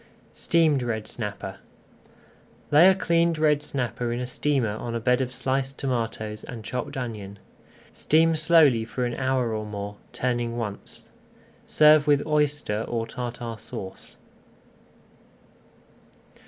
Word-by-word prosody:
STEAMED 160 Hz, -5 st, +2 dB
RED 110 Hz, -3 st, -2 dB
SNAPPER 105 Hz, -3 st, -5 dB, 1.1 s
Lay 160 Hz, +6 st, +8 dB
a 190 Hz, -, +4 dB
cleaned 170 Hz, -2 st, +2 dB
red 150 Hz, -1 st, +3 dB
snapper 125 Hz, -4 st, -3 dB
in 120 Hz, -, -2 dB
a 125 Hz, -, -2 dB
steamer 125 Hz, -4 st, 0 dB
on 115 Hz, 0 st, -5 dB
a -, -, -1 dB
bed 125 Hz, +2 st, +2 dB
of 125 Hz, -1 st, -2 dB
sliced 135 Hz, +1 st, -2 dB
tomatoes 115 Hz, -4 st, -3 dB
and 115 Hz, -3 st, -8 dB
chopped 125 Hz, +4 st, -4 dB
onion. 105 Hz, -6 st, -5 dB, 0.6 s
Steam 165 Hz, +2 st, +3 dB
slowly 155 Hz, -7 st, +5 dB
for 125 Hz, +3 st, -3 dB
an 120 Hz, -, -2 dB
hour 130 Hz, -3 st, 0 dB
or 110 Hz, 0 st, -2 dB
more, 105 Hz, -1 st, -6 dB
turning 120 Hz, -2 st, -2 dB
once. 105 Hz, -4 st, -6 dB, 0.6 s
Serve 150 Hz, 0 st, +5 dB
with 145 Hz, -1 st, +3 dB
Oyster 145 Hz, -7 st, 0 dB
or 115 Hz, -1 st, -2 dB
Tartar 120 Hz, -2 st, -6 dB
Sauce. 95 Hz, -2 st, -9 dB
125 Hz, 125 wpm, -25 LUFS, 115-145 Hz, 1.1 s, Lay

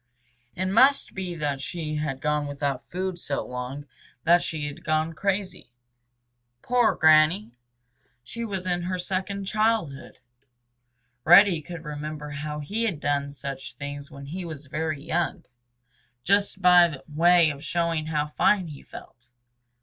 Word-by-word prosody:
It 185 Hz, -, -2 dB
must 255 Hz, +9 st, +4 dB
be 185 Hz, -2 st, -4 dB
that 145 Hz, -4 st, -2 dB
she 155 Hz, +1 st, -4 dB
had 140 Hz, -3 st, -3 dB
gone 150 Hz, -1 st, 0 dB
without 140 Hz, -2 st, -3 dB
food 185 Hz, 0 st, -3 dB
so 140 Hz, -4 st, -3 dB
long 125 Hz, +3 st, -6 dB, 0.4 s
that 175 Hz, +1 st, +5 dB
she 155 Hz, -2 st, -4 dB
had 145 Hz, +4 st, -7 dB
gone 155 Hz, -1 st, 0 dB
crazy. 190 Hz, -5 st, -2 dB, 0.9 s
Poor 245 Hz, -2 st, +3 dB
Granny! 155 Hz, -, +4 dB, 0.7 s
She 235 Hz, -, -6 dB
was 195 Hz, -5 st, -4 dB
in 175 Hz, -1 st, 0 dB
her 180 Hz, +1 st, -2 dB
second 190 Hz, +2 st, -3 dB
childhood. 215 Hz, -9 st, -1 dB, 1.1 s
Reddy 175 Hz, 0 st, +7 dB
could 165 Hz, +1 st, -9 dB
remember 150 Hz, 0 st, -6 dB
how 150 Hz, +1 st, -5 dB
he 215 Hz, +10 st, -2 dB
had 185 Hz, -9 st, -2 dB
done 145 Hz, -1 st, 0 dB
such 140 Hz, -1 st, -7 dB
things 145 Hz, 0 st, -7 dB
when 140 Hz, -2 st, -10 dB
he 180 Hz, +6 st, -6 dB
was 155 Hz, -4 st, -8 dB
very 150 Hz, 0 st, -3 dB
young, 170 Hz, +2 st, -2 dB, 0.8 s
just 200 Hz, 0 st, +1 dB
by 175 Hz, -5 st, +6 dB
way 165 Hz, +1 st, +4 dB
of 140 Hz, 0 st, -9 dB
showing 165 Hz, -2 st, -1 dB
how 150 Hz, -2 st, 0 dB
fine 175 Hz, +4 st, +1 dB
he 145 Hz, -2 st, -10 dB
felt. 120 Hz, 0 st, -13 dB
160 Hz, 140 wpm, -25 LUFS, 145-185 Hz, 1.1 s, Reddy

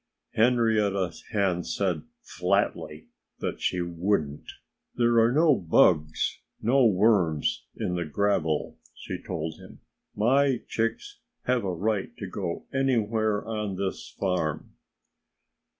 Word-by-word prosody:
Henrietta 110 Hz, -6 st, +2 dB, 0.2 s
Hen 95 Hz, -5 st, +1 dB
said 90 Hz, -6 st, -1 dB, 0.2 s
flatly 75 Hz, 0 st, -1 dB, 0.3 s
that -, -, -4 dB
she 90 Hz, -, 0 dB
wouldn't. 85 Hz, -4 st, -1 dB, 0.4 s
"There 120 Hz, -1 st, +3 dB
are 115 Hz, +1 st, +4 dB
no 155 Hz, +3 st, +5 dB
bugs 80 Hz, -4 st, +2 dB, 0.2 s
no 130 Hz, +4 st, +3 dB
worms 95 Hz, -7 st, +2 dB
in 90 Hz, -, -2 dB
the 85 Hz, -1 st, -2 dB
gravel," 80 Hz, -2 st, 0 dB, 0.2 s
she -, -, -6 dB
told 80 Hz, -2 st, -5 dB
him. -, -, -14 dB, 0.3 s
"My 130 Hz, +4 st, +2 dB
chicks 115 Hz, -, -2 dB, 0.2 s
have 125 Hz, -2 st, +1 dB
a 95 Hz, -, -1 dB
right 100 Hz, +3 st, -2 dB
to 100 Hz, -, -5 dB
go 90 Hz, -3 st, -4 dB
anywhere 110 Hz, -5 st, +1 dB
on 105 Hz, -3 st, -3 dB
this 95 Hz, 0 st, -4 dB
farm." 90 Hz, -6 st, -2 dB
100 Hz, 115 wpm, -27 LUFS, 85-115 Hz, 0.4 s, no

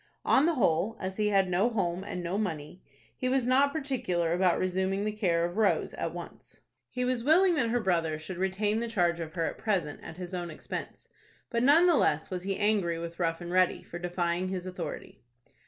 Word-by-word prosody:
On 275 Hz, +4 st, +4 dB
the 335 Hz, -, +2 dB
whole, 215 Hz, -, +1 dB
as 190 Hz, 0 st, -4 dB
he 210 Hz, -1 st, +1 dB
had 195 Hz, -2 st, +3 dB
no 185 Hz, +6 st, +2 dB
home 185 Hz, -5 st, -1 dB
and 180 Hz, -3 st, -5 dB
no 175 Hz, +2 st, -2 dB
money, 170 Hz, -3 st, -4 dB, 0.3 s
he 255 Hz, -, -2 dB
was 260 Hz, -1 st, +1 dB
not 270 Hz, +3 st, +4 dB
particular 245 Hz, -, -1 dB
about 180 Hz, -1 st, +3 dB
resuming 190 Hz, +2 st, 0 dB
the 215 Hz, -, 0 dB
care 175 Hz, -6 st, +1 dB
of 175 Hz, +3 st, -5 dB
Rose 215 Hz, -3 st, +2 dB
at -, -, -3 dB
once. -, -, -10 dB, 0.3 s
He 250 Hz, 0 st, -2 dB
was 250 Hz, -2 st, 0 dB
willing 350 Hz, +6 st, +5 dB
that 260 Hz, -8 st, +1 dB
her 245 Hz, +1 st, +1 dB
brother 165 Hz, -7 st, 0 dB
should 170 Hz, +3 st, -7 dB
retain 205 Hz, +3 st, 0 dB
the 235 Hz, -, -2 dB
charge 175 Hz, -6 st, +1 dB
of 160 Hz, 0 st, -6 dB
her 165 Hz, -2 st, 0 dB
at -, -, -4 dB
present 180 Hz, -9 st, -1 dB
at 160 Hz, -, -9 dB
his 180 Hz, 0 st, -7 dB
own 175 Hz, -1 st, -3 dB
expense, 155 Hz, -, -7 dB, 0.4 s
but 235 Hz, -1 st, +1 dB
none 295 Hz, +7 st, +6 dB
the 345 Hz, -4 st, +5 dB
less 150 Hz, +4 st, +1 dB
was 180 Hz, -1 st, -3 dB
he 195 Hz, +1 st, -2 dB
angry 205 Hz, -5 st, +1 dB
with 170 Hz, +1 st, -7 dB
Rough 165 Hz, -1 st, 0 dB
and 175 Hz, 0 st, -6 dB
Ready 185 Hz, 0 st, +2 dB
for 175 Hz, -, -8 dB
defying 175 Hz, 0 st, -1 dB
his 185 Hz, -1 st, -4 dB
authority. 180 Hz, -4 st, -6 dB
185 Hz, 215 wpm, -29 LUFS, 175-225 Hz, 0.4 s, none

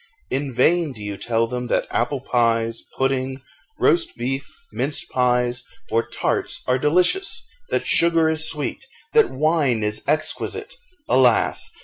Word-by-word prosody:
In 135 Hz, +1 st, -2 dB
vain 155 Hz, +5 st, +2 dB
do 105 Hz, -4 st, -9 dB
you 105 Hz, -1 st, -4 dB
tell 115 Hz, +2 st, 0 dB
them 125 Hz, +1 st, -4 dB
that -, -, 0 dB
apple 130 Hz, +3 st, -1 dB
pies, 115 Hz, -3 st, 0 dB, 0.2 s
pudding, 135 Hz, 0 st, -1 dB, 0.4 s
roast 345 Hz, -1 st, +2 dB
beef, 135 Hz, +3 st, -3 dB, 0.2 s
minced 145 Hz, +1 st, -2 dB
pies, 125 Hz, -1 st, +1 dB, 0.3 s
or 115 Hz, -, +3 dB
tarts, -, -, -2 dB
are 125 Hz, 0 st, +1 dB
delicious, 180 Hz, -, +1 dB, 0.2 s
that -, -, -1 dB
sugar 165 Hz, -1 st, +4 dB
is 160 Hz, 0 st, +3 dB
sweet, 150 Hz, -, -4 dB, 0.3 s
that 450 Hz, -1 st, +5 dB
wine 145 Hz, -6 st, +1 dB
is 105 Hz, 0 st, 0 dB
exquisite. 155 Hz, +2 st, 0 dB, 0.3 s
Alas! 125 Hz, -3 st, +3 dB
130 Hz, 135 wpm, -22 LUFS, 120-155 Hz, 0.4 s, that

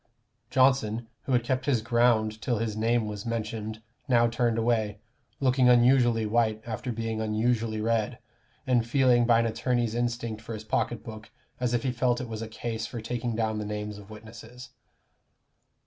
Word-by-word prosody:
Johnson, 125 Hz, -4 st, +2 dB, 0.2 s
who -, -, -3 dB
had 120 Hz, -1 st, +3 dB
kept 130 Hz, +2 st, -2 dB
his 125 Hz, -6 st, +2 dB
ground 115 Hz, -2 st, +2 dB
till 120 Hz, -1 st, 0 dB
his 110 Hz, -1 st, -2 dB
name 115 Hz, +1 st, +1 dB
was 105 Hz, -1 st, -5 dB
mentioned, 110 Hz, -1 st, -4 dB, 0.2 s
now 120 Hz, -3 st, +4 dB
turned 115 Hz, 0 st, 0 dB
away, 110 Hz, -3 st, 0 dB, 0.4 s
looking 130 Hz, -1 st, +3 dB
unusually 120 Hz, -2 st, +4 dB
white 110 Hz, 0 st, +1 dB
after 120 Hz, +2 st, -4 dB
being 115 Hz, -1 st, -3 dB
unusually 110 Hz, 0 st, 0 dB
red, 110 Hz, -1 st, 0 dB, 0.5 s
and 125 Hz, -2 st, +3 dB
feeling 125 Hz, -2 st, +3 dB
by 115 Hz, -1 st, +5 dB
an -, -, 0 dB
attorney's 120 Hz, 0 st, 0 dB
instinct 120 Hz, -2 st, -2 dB
for 115 Hz, 0 st, -6 dB
his 110 Hz, -, -8 dB
pocket 110 Hz, +2 st, -1 dB
book, 110 Hz, -2 st, -9 dB, 0.3 s
as 125 Hz, -1 st, 0 dB
if 115 Hz, -, -1 dB
he 130 Hz, -, 0 dB
felt 125 Hz, 0 st, +1 dB
it 125 Hz, -, -5 dB
was 110 Hz, -1 st, -6 dB
a 115 Hz, -, -4 dB
case 110 Hz, 0 st, -4 dB
for 120 Hz, -, -6 dB
taking 120 Hz, +1 st, -3 dB
down 110 Hz, -1 st, -1 dB
the -, -, -3 dB
names 105 Hz, 0 st, -5 dB
of 100 Hz, 0 st, -14 dB
witnesses. 115 Hz, +3 st, -11 dB
115 Hz, 175 wpm, -27 LUFS, 110-120 Hz, 0.5 s, by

